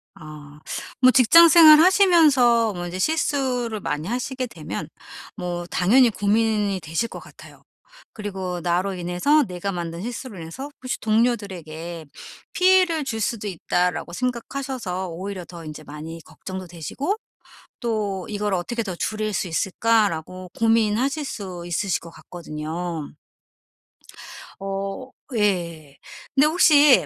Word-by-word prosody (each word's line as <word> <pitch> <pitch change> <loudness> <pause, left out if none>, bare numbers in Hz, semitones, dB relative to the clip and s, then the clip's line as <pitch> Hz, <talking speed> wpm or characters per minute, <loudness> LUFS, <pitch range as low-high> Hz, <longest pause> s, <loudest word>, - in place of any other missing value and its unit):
아 150 -2 -12 0.4
뭐 255 - +7
직장 330 +7 +7
생활 315 -3 +9
하시면서 300 - +5
뭐 175 0 -5
이제 180 +1 -6
실수를 255 -5 0
많이 150 -1 -3
하시게 255 +2 -3
되면 - - -6 0.5
뭐 175 -3 -4
당연히 235 +9 +4
고민이 210 -2 +1
되실 165 +9 -2
것 - - -8
같아요. - - -15 0.5
그리고 190 -4 -5
나로 180 +3 0
인해서 180 - +2
내가 185 -2 -4
만든 170 -1 -5
실수로 240 -1 -6
인해서 210 - -7
혹시 255 0 -3
동료들에게 185 -8 -1 0.5
'피해를 365 -4 +4
줄 225 -4 -3
수도 215 -1 -2
있다.'라고 180 -1 -1
생각하셔서 250 -5 -3
오히려 185 +1 -6
더 170 -1 -11
인제 155 0 -8
많이 155 +3 -8
걱정도 185 -1 -8
되시고 175 - -3 0.6
또 210 -6 -2
'이거를 205 -2 -1
어떻게 235 +7 -3
더 185 -4 -5
줄일 215 +3 -2
수 185 - -1
있을까?'라고 185 -1 0
고민하실 230 +6 +2
수 185 -8 -6
있으실 175 +2 -1
것 170 - -12
같거든요. 165 -1 -6 1.5
어 195 +5 -4 0.3
예. 170 -9 -1 0.4
근데 285 +3 +5
혹시 300 -4 +6
200 Hz, 275 characters per minute, -23 LUFS, 175-250 Hz, 1.5 s, 생활